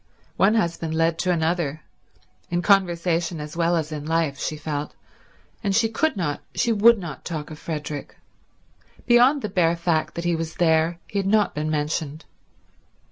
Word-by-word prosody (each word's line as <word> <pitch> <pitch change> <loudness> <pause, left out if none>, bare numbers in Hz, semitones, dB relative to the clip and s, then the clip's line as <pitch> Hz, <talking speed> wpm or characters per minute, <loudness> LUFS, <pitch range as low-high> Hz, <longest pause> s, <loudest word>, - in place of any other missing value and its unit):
One 205 +3 +4
husband 165 -5 -1
led 165 0 +1
to 180 - +1
another, 160 -3 -1 0.7
in 175 0 -1
conversation 175 -4 +2
as 150 +1 -7
well 170 0 +2
as 160 -2 -2
in 150 -1 -5
life, 160 -3 0
she 155 - -3
felt, 150 -1 -4 0.7
and 200 -2 0
she 225 +1 +3
could 310 +3 0
not, 150 -6 -2
she 235 - +1
would 225 +2 +6
not, 170 -7 -7
talk 155 -2 -5
of 155 - -9
Frederick. 150 -2 -6 0.9
Beyond 250 +4 +5
the - - 0
bare 170 -3 +2
fact 170 -2 -1
that 170 - -4
he 175 -1 +2
was 160 0 -4
there, 165 0 +2
he 200 - -3
had 195 - -1
not 210 +1 +3
been 155 +1 -2
mentioned. 155 0 -2
165 Hz, 170 wpm, -23 LUFS, 155-190 Hz, 0.9 s, would